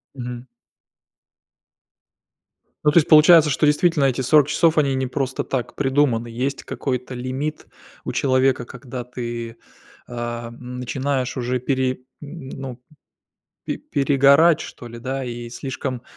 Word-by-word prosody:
Мгм. 125 -1 -6 2.4
Ну 150 - +6
то 150 - +3
есть 155 - 0
получается, 155 0 +7
что 145 - +2
действительно 150 0 +3
эти 135 -1 +1
40 140 +2 +4
часов 160 0 +3
они 140 -3 +3
не 130 0 -1
просто 130 0 -2
так 130 -3 -3
придуманы. 135 -4 +1
Есть 130 +4 -3
какой-то 125 -1 -3
лимит 130 +5 -4 0.4
у - - -3
человека, 130 -2 +2
когда 125 0 -8
ты, 120 -2 -6 0.5
а, 120 -1 -5
начинаешь 125 +2 -3
уже 125 0 -1
пере 130 0 -1 0.2
н 145 -2 -9
ну, 130 -2 -7 0.8
пе - - -2
перегорать 140 +3 +4
что 120 - -9
ли 120 0 -10
да, 130 +2 -3
и 120 -1 -6
слишком 130 0 -5
130 Hz, 130 wpm, -22 LUFS, 125-140 Hz, 2.4 s, получается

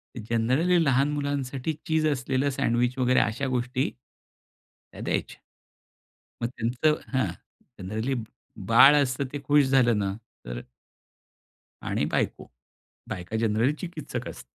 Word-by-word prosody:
Generally 120 +10 +1
लहान 140 0 +2
मुलांसाठी 140 0 -2
चीज 160 -1 +2
असलेलं 135 -1 0
सँडविच 125 -2 0
वगैरे 130 0 +3
अशा 115 +6 0
गोष्टी, 125 +2 -1 1.0
त्या - - -10
द्यायचे. - - -2 1.0
मग 120 - +1
त्यांचं 120 +7 +1 0.2
हां. 130 - +2 0.5
जनरली 110 +7 -2 0.6
बाळ 135 +5 +8
असतं 130 +1 -2
ते 145 - -3
खुश 145 +1 +4
झालं 125 -4 +4
ना, 100 -1 -1 0.3
तर - - -5 1.2
आणि - - -1
बायको. - - -1 0.6
बायका 90 +4 -5
जनरली 115 +4 +2
चिकित्सक 165 -1 -6
असते. - - -10
130 Hz, 115 wpm, -26 LUFS, 115-145 Hz, 1.2 s, बाळ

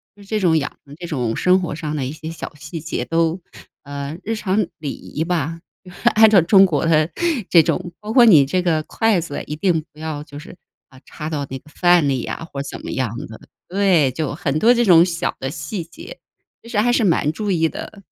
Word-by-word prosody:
就 205 - -16
这 215 +2 -2
种 165 -4 +3
养 145 - -3
成 140 +1 -13
这 175 +1 -8
种 125 -8 -2
生 185 +1 +3
活 165 -4 -4
上 155 -2 -4
的 135 - -2
一 135 - -4
些 160 +1 -7
小 165 0 -8
细 155 +2 -8
节 165 - -3
都 165 +2 0 0.4
呃， 140 +2 -6
日 225 +1 -2
常 200 -1 0
礼 145 -4 -4
仪 155 - -5
吧， 165 -1 -2 0.5
按 220 0 +7
照 195 -5 +6
中 195 +3 +6
国 160 -4 0
的 155 0 +3 0.4
这 165 -3 +6
种， 175 +1 -2
包 210 +1 -6
括 245 -3 +7
你 155 -11 +7
这 180 +6 0
个 160 -3 0
筷 220 -2 +1
子 145 -4 -5
一 150 - -4
定 165 -1 +1
不 - - -24
要 155 -2 -4
就 145 -2 -12
是， 175 - -12 0.3
呃， 130 -2 -17
插 155 0 -7
到 145 -3 -3
那 135 - -5
个 150 - -20
饭 175 -2 +3
里 130 -3 0
呀 165 - -5
或 140 - -4
者 140 - -7
怎 - - -8
么 - - -5
样 120 -3 -2
的， 110 - -11 0.3
对。 180 -8 +3
就 150 +1 -3
很 150 -2 -1
多 235 +2 +5
这 240 0 +2
种 170 -2 +7
小 170 -2 -2
的 135 - -3
细 150 +5 -5
节， 165 - -12 0.4
其 230 - -14
实 225 - -3
还 240 +3 +3
是 235 - +2
蛮 155 -4 +2
注 205 +5 -4
意 165 -2 +2
的。 200 -2 -9
165 Hz, 250 characters per minute, -20 LUFS, 150-185 Hz, 0.5 s, 按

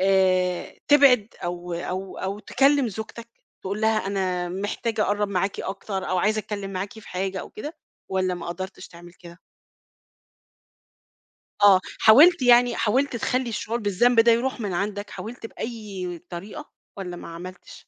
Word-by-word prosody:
آآ 185 -2 +2
تبعد 275 -7 +6 0.2
أو 175 0 -4
أو 185 +2 -5
أو 195 +2 -3
تكلّم 275 +4 +2
زوجتك 220 +2 -8 0.3
تقول 200 +3 -4
لها 220 -2 +1
أنا 185 -3 -1
محتاج 205 +4 -3
أقرّب 205 -1 +1
معاكِ 195 0 -1
أكتر 195 0 -4
أو 185 - +1
عايزة 215 +4 +2
أتكلّم 200 -2 -4
معاكِ 190 +2 -4
في - - -13
حاجة 190 0 -3
أو - - -10
كده 295 +9 -7 0.3
والّا 185 -1 0
ما 170 -1 -7
قدرتش 185 +2 -6
تعمل 175 0 -14
كده؟ 170 0 -14 2.2
آه. 195 -2 +8 0.2
حاولت 295 +8 +7
يعني 245 -1 +5
حاولت 255 +4 +1
تخلّي 250 +2 -1
الشعور 225 +1 -3
بالذنب 225 +4 +3
ده 230 0 +6
يروح 250 +2 0
من 205 -3 -3
عندك، 205 +2 -3
حاولت 225 +1 -7
بأي 200 -8 -6
طريقة 175 +4 -8 0.3
والّا 180 -3 -6
ما - - -9
عملتش؟ 175 +2 -10
200 Hz, 150 wpm, -24 LUFS, 185-225 Hz, 2.2 s, آه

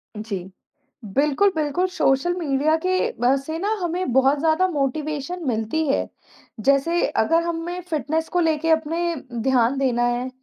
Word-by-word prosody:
जी। 210 -1 -4 0.8
बिल्कुल, 300 +8 +3
बिल्कुल, 310 +4 0
social 270 +6 +2
media 305 -1 +1
के 370 0 +1
बा 250 +2 +4
से 315 +4 -5
ना 400 +4 -1
हमें 350 -3 -2
बहुत 265 +2 +3
ज़्यादा 320 +4 +2
मोटिवेशन 305 +2 -3
मिलती 230 +7 -1
है। 275 - +1 0.6
जैसे 305 +5 +2 0.2
अगर 330 +7 +2
हमें 340 +1 -3
फिटनेस 315 +1 -1
को 355 - 0
लेके 325 -1 +1
अपने 330 +2 0 0.3
ध्यान 255 +1 +2
देना 250 -3 +1
है, 240 +1 0
305 Hz, 145 wpm, -22 LUFS, 270-335 Hz, 0.8 s, बा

